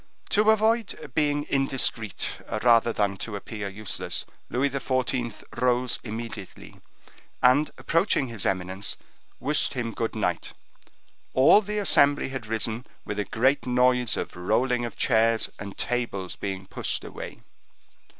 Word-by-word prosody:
To 210 +1 +4
avoid 220 - +2
being 145 0 +1
indiscreet, 135 -6 0 0.4
rather 115 -1 +5
than 100 -3 0
to 105 +2 -5
appear 100 0 -5
useless, 105 +1 -3 0.2
Louis 135 +3 +1
XIV. 130 -4 -1 0.2
rose 125 0 +2
immediately, 110 -3 -7 0.6
and 130 +4 +5
approaching 165 -5 +1
his 115 -4 -5
eminence, 95 +1 -1 0.4
wished 145 +1 +1
him 115 -3 -2
good 115 -1 -2
night. 110 - -1 0.8
All 135 +10 +7
the 210 0 -4
assembly 145 -9 +4
had 130 -4 -5
risen 110 +2 -1 0.2
with 105 - -3
a 105 - 0
great 130 +2 +1
noise 125 -1 +3
of - - -4
rolling 120 +7 +1
of 120 - -7
chairs 115 -1 +2
and 100 -1 -7
tables 115 -7 -2
being 95 -1 -4
pushed - - -1
away. - - -8
120 Hz, 130 wpm, -26 LUFS, 110-135 Hz, 0.8 s, All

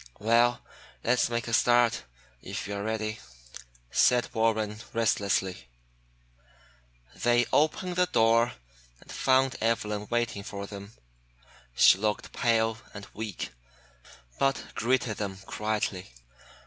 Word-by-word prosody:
"Well, 120 +3 +3 0.4
let's 120 +1 +2
make 120 -1 -2
a 115 - -4
start, 120 - +3 0.4
if - - -5
you 100 - -4
are 100 0 -4
ready," 110 0 -3 0.7
said 125 -1 +3
Warren 110 -2 0
restlessly. 100 - 0 1.5
They 120 0 +2
opened 175 +4 +1
the 180 0 +3
door 115 -2 +3 0.5
and - - -14
found 130 0 +2
Evelyn 105 -2 -1
waiting 120 -4 -1
for 100 0 -6
them. 100 +1 -10 0.8
She 95 - +6
looked 105 0 -2
pale 115 -1 +1 0.2
and 100 0 -8
weak, 110 -3 -5 0.9
but 135 0 +1
greeted 120 -2 0
them 100 -2 -4
quietly. 105 - -2
115 Hz, 110 wpm, -28 LUFS, 105-120 Hz, 1.5 s, She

